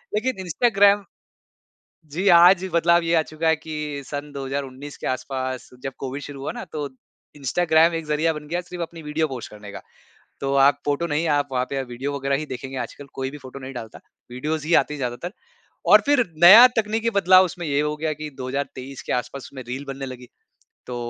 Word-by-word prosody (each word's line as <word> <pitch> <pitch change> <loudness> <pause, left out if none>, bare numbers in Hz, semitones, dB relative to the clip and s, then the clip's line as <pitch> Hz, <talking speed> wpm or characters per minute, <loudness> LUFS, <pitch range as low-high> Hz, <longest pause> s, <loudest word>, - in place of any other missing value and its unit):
लेकिन 235 +1 -1
इंस्टाग्राम 200 +2 +3 1.1
जी, 185 +5 -2
आज 175 +1 +7
बदलाव 170 +1 +4
ये 165 0 0
आ - - +5
चुका 155 +1 -2
है 160 - +4
कि 150 -2 -5
सन 145 0 -6
2019 140 0 -5
के - - -7
आसपास 130 0 -3
जब 135 - -4
कोविड 135 +2 -5
शुरू 145 -2 -8
हुआ 135 - -4
ना, 240 -1 -7
तो 150 -4 -5 0.5
इंस्टाग्राम 160 +3 +3
एक 165 -1 -3
ज़रिया 155 +2 +1
बन 150 -1 -8
गया 175 +2 -1
सिर्फ़ 180 0 -7
अपनी 165 0 -7
वीडियो 150 +1 -1
पोस्ट 130 -4 -7
करने 105 -1 -11
का। - - -8 0.6
तो 135 0 -1
आप 140 +1 +5
फोटो 145 +4 0
नहीं, 155 +1 -1
आप 145 -1 +1
वहाँ 125 -1 +1
पे 135 -1 -1
वीडियो 130 +3 -5
वगैरह 140 0 0
ही 155 - -4
देखेंगे 135 0 -7
आजकल, 145 +2 -7
कोई 135 0 -3
भी 150 - -9
फोटो 130 -1 -10
नहीं 130 +1 -7
डालता। 115 -2 -8 0.3
वीडियोस 150 +5 -3
ही 165 +2 +1
आती 150 - -8
हैं 150 - -7
ज़्यादातर, 125 +8 -4 0.5
और - - +7
फिर 285 -4 +3 0.2
नया 215 +8 +11
तकनीकी 220 +2 0
बदलाव 185 0 +6
उसमें 175 0 -6
ये 140 +1 +1
हो 150 0 -1
गया 155 0 -1
कि 150 +1 -7
2023 135 0 -5
के - - 0
आसपास 125 +2 -3
उसमें 130 -2 -9
रील 135 +3 -5
बनने 135 0 -5
लगी, 125 -1 -9 0.6
तो 125 - -5
150 Hz, 200 wpm, -23 LUFS, 135-170 Hz, 1.1 s, नया